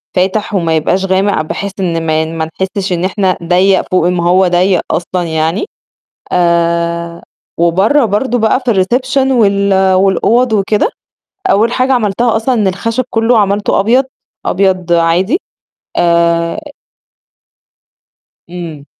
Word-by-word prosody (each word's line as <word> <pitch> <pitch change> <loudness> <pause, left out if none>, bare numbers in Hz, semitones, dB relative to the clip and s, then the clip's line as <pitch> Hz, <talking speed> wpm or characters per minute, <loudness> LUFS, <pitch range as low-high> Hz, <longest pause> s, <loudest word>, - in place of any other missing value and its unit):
فاتح 195 +3 0
وما 165 -4 0
يبقاش 180 +5 0
غامق 190 -2 +1
بحيث 200 +5 -4
إن 165 -3 -2
ما 155 0 +1
ما 160 0 -4 0.2
نحسش 190 0 -2
إن 175 +1 -1
إحنا 190 -1 0
ضيّق 185 +3 +2
فوق 180 -2 +2
ما 180 -1 0
هو 185 +1 +4
ضيّق 180 +1 +2
أصلًا 175 +2 -2
يعني، 160 - -1 0.7
آآ، 170 -1 0 0.4
وبرّه 195 - +2
برضه 240 +4 -1
بقى 220 +3 +2
في 235 - +2
الreception 255 +7 0
وال 200 -4 +2
والأوض 210 +6 +2
وكده، 210 - +1 0.6
أول 225 +4 +2
حاجة 260 +1 +1
عملتها 230 0 +1
أصلًا 235 +3 0
إن 210 -4 +1
الخشب 230 +7 -2
كلّه 225 +1 +2
عملته 205 0 +1
أبيض، 245 +6 +2 0.4
أبيض 185 -2 0
عادي 175 - +2 0.6
آآ 170 - +1 1.9
امم. 165 -5 -8
190 Hz, 125 wpm, -13 LUFS, 170-220 Hz, 1.9 s, هو